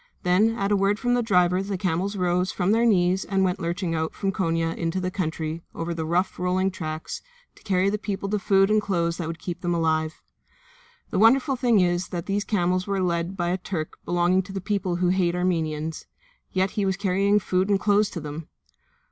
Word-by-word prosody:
Then 205 +5 +3
at 200 +1 -1
a - - +4
word 200 +1 +2
from 245 +2 0
the 245 - +2
driver 180 -4 +3
the 195 0 -3
camels 185 +2 -1
rose 180 0 +1
from 180 +1 0
their 230 +2 +3
knees 185 -2 +3
and 195 -1 0
went 185 0 0
lurching 170 0 -2
out 160 0 -2
from 195 - -1
Konia 165 -3 -1
into 165 +2 -2
the 185 0 -2
country, 160 -3 -3
over 170 +1 -3
the 160 -1 -3
rough, 180 +3 0
rolling 185 +1 +1
tracks, 155 -3 -5 0.3
to - - -21
carry 185 -1 +1
to 200 - +2
the 210 - 0
people 200 -1 -3
the 210 +1 0
food 195 +1 +3
and 215 0 +4
clothes 170 -4 -1
that 170 - -3
would 165 0 -4
keep 175 0 -6
them 175 -1 0
alive. 160 -1 0 0.9
The 185 - 0
wonderful 265 +5 +4
thing 240 -5 +3
is 175 0 +1
that 170 -2 -5
these 200 +1 -1
camels 185 -2 0
were 200 -1 0
led 175 +1 -1
by 175 -1 0
a 185 +2 -1
Turk 170 -4 -5
belonging 175 +2 +2
to 190 +1 -10
the 195 - -3
people 190 -2 -1
who 175 0 +1
hate 180 -2 +2
the - - -2
Armenians, 160 -3 -2 0.4
yet 185 0 +1
he 210 - -1
was 190 -2 0
carrying 200 +1 +2
food 185 0 0
and 200 -1 +3
clothes 205 +1 +3
to 170 - -6
them! 150 +1 -7
185 Hz, 220 wpm, -25 LUFS, 170-200 Hz, 0.9 s, a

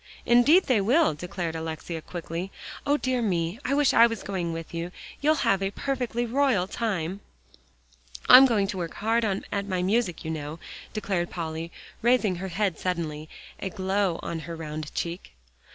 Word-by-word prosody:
"Indeed 280 +10 +6
they 245 -7 +2
will," 255 - +3
declared 170 +1 -4
Alexia 160 0 -5
quickly. 175 +2 -5 0.4
"O 290 +1 +4
dear 255 -3 0
me, 180 -1 -1
I 275 - 0
wish 290 -2 +3
I 235 - +7
was 230 -2 -5
going 180 -4 -2
with 165 0 -6
you. 170 +1 -4 0.3
You'll 305 +2 +4
have 195 0 +3
a 195 - 0
perfectly 245 +1 -2
royal 240 -6 +2
time. 195 -5 -2 1.1
"I'm 260 +2 +10
going 215 -5 +2
to 190 - -3
work 170 -2 -4
hard 225 +3 +1
at 200 -1 -2
my 185 -2 -1
music, 195 -4 0
you 160 - -2
know," 150 0 -5 0.3
declared 190 -5 -2
Polly, 165 -1 -5 0.3
raising 235 -6 +3
her 190 +2 -4
head 190 -2 -1
suddenly, 160 -4 -3 0.3
a 190 - -3
glow 190 -1 0
on 165 - -3
her 165 +2 -7
round 155 -2 -6
cheek. 170 +2 -4
190 Hz, 170 wpm, -26 LUFS, 165-230 Hz, 1.1 s, I'm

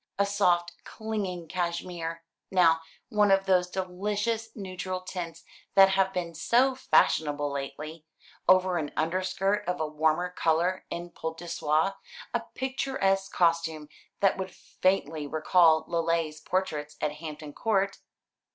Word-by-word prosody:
A 200 - +3
soft 180 -4 +1
clinging 200 -6 -4
cashmere, 170 -1 -3 0.3
now, 165 -3 +4 0.3
one 210 -3 +3
of 195 0 +4
those 180 -2 +3
delicious 205 +5 -2
neutral 185 -2 -4
tints 170 -3 -6 0.3
that 195 -1 +8
have 190 0 +2
been 175 -3 -3
so 245 - +3
fashionable 145 - +2
lately, 150 +3 -6 0.4
over 185 -1 +5
an 145 -2 -4
underskirt 185 +5 0
of 180 0 -1
a 160 - 0
warmer 155 +3 +1
colour 175 +2 0
in 175 0 -5
poult 160 -1 -5
de 175 - -9
soie, 160 +4 +1 0.4
a 235 - +2 0.2
picturesque 260 -8 0
costume 165 -3 +1 0.3
that 195 -1 +3
would 190 0 -3
faintly 160 -8 -1
recall 160 +1 +4
Lely's 165 -2 0
portraits 150 -6 -2
at 150 - 0
Hampton 150 -2 -8
Court." 195 -1 0
180 Hz, 130 wpm, -28 LUFS, 160-195 Hz, 0.4 s, that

